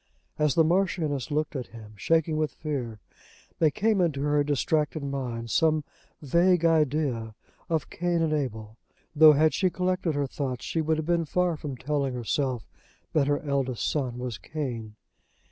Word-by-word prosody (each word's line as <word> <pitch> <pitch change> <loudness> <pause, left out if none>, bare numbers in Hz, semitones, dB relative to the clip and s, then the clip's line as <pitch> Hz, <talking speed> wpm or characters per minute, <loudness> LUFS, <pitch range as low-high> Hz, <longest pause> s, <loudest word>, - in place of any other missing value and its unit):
As 150 -3 +2
the 165 - +5
Marchioness 165 -5 0
looked 155 0 -1
at 130 -3 -4
him, 110 -2 -12
shaking 160 - +1
with 155 -1 -1
fear, 130 -8 -4 0.6
there 160 - +5
came 210 +5 +1
into 150 -6 0
her 145 0 +2
distracted 150 +1 0
mind 125 -5 -4
some 155 -2 +3 0.4
vague 170 +4 +3
idea 145 -8 +1 0.3
of 160 -3 -1
Cain 175 -1 0
and 155 -1 +1
Abel, 110 -6 -3 0.4
though 155 0 +9
had 155 +2 +3
she 190 -2 +2
collected 180 -3 -1
her 145 -1 0
thoughts 130 -2 -4
she 165 - -1
would 160 0 +1
have 155 - -3
been 170 0 +1
far 180 +2 +1
from 145 -3 -6
telling 140 0 -1
herself 125 0 -2 0.5
that 145 -3 +3
her 145 0 0
eldest 135 -4 -1
son 130 -5 -1
was 125 -4 -5
Cain. 120 -8 -5
150 Hz, 160 wpm, -27 LUFS, 130-160 Hz, 0.6 s, though